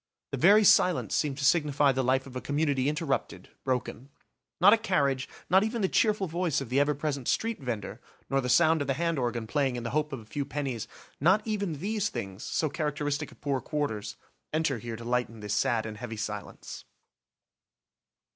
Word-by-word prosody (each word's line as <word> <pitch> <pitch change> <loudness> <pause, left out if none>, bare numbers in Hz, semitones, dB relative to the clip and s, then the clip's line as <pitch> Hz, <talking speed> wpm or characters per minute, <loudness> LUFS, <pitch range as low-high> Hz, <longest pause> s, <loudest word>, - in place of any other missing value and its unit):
The 140 - -2
very 205 +8 +7
silence 185 -3 +4
seemed 145 -3 0
to 140 - -1
signify 145 -2 +3
the 130 0 0
life 130 +1 +1
of 130 -2 -11
a 125 - -3
community 145 -2 0
interrupted, 150 -2 -2
broken. 130 0 -3 0.5
Not 195 +5 +8
a - - +6
carriage, 140 -12 0 0.2
not 190 +3 +5
even 220 0 -2
the - - +4
cheerful 210 0 +2
voice 170 -2 0
of 135 -4 -6
the 130 +3 +2
ever 145 +1 +2
present 140 -3 -3
street 230 0 0
vender, 115 -6 -4 0.3
nor 135 0 +1
the 125 - -3
sound 160 +2 +4
of 140 - -2
the 135 - +1
hand 165 -1 0
organ 120 -2 -2
playing 135 +1 0
in 120 - -4
the 115 - -3
hope 150 +2 0
of 135 - -4
a 110 - -13
few 140 +6 -3
pennies, 135 -5 -4 0.3
not 190 +8 +3
even 200 -6 -1
these 200 +6 -1
things, 100 -4 -6
so 160 - 0
characteristic 150 -1 -2
of - - -19
poor 140 -3 -1
quarters, 145 -9 -3 0.4
enter 155 -5 0
here 115 0 -6
to 115 +1 -9
lighten 120 -2 -1
this 105 -1 -3
sad 115 -1 +1
and 110 -1 -6
heavy 110 0 -6
silence. 105 -1 -6
140 Hz, 195 wpm, -28 LUFS, 125-160 Hz, 0.5 s, Not